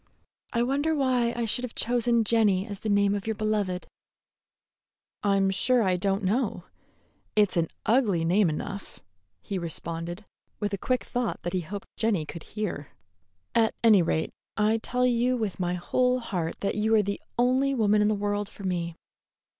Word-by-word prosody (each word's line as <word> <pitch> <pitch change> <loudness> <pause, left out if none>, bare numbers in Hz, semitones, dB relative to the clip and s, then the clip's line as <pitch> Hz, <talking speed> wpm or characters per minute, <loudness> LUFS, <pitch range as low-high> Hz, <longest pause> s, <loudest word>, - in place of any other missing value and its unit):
I 235 -1 +1
wonder 285 +5 +1
why 255 -4 +2
I 235 -1 -1
should 235 +3 -1
have 250 - -5
chosen 235 -1 +2
Jenny 205 -4 +3
as 205 -3 -7
the 220 - -3
name 200 0 +3
of 205 +1 -3
your 220 - 0
beloved." 205 -4 -1 1.4
"I'm 195 -1 +2
sure 245 +5 +3
I 185 -2 +2
don't 195 +2 0
know; 205 -1 0 0.7
it's 210 -3 +3
an 165 -1 +2 0.2
ugly 210 -9 +3
name 180 +2 +3
enough," 195 +6 -5 0.4
he 195 -2 -3
responded, 170 +3 -5 0.3
with 205 -1 -2
a - - 0
quick 255 +5 0
thought 245 -2 -3
that 175 - -3
he 185 - 0
hoped 200 +6 -7
Jenny 210 -8 +1
could 165 +2 -8 0.2
hear. 180 -9 -3 0.7
"At 225 -1 +3
any 215 -5 +7
rate, 160 -1 0 0.3
I 215 +1 +3
tell 250 +3 0
you 250 +1 +2
with 215 -5 -3
my 180 -1 0
whole 250 +8 +1
heart 180 -9 -3
that 200 - 0
you 220 +1 +2
are 215 - +4
the 200 0 -3 0.2
only 260 +3 +3
woman 210 -3 +3
in 210 - +4
the 215 - +2
world 205 0 -1
for 200 - -12
me." 170 -3 -2
210 Hz, 175 wpm, -27 LUFS, 185-235 Hz, 1.4 s, any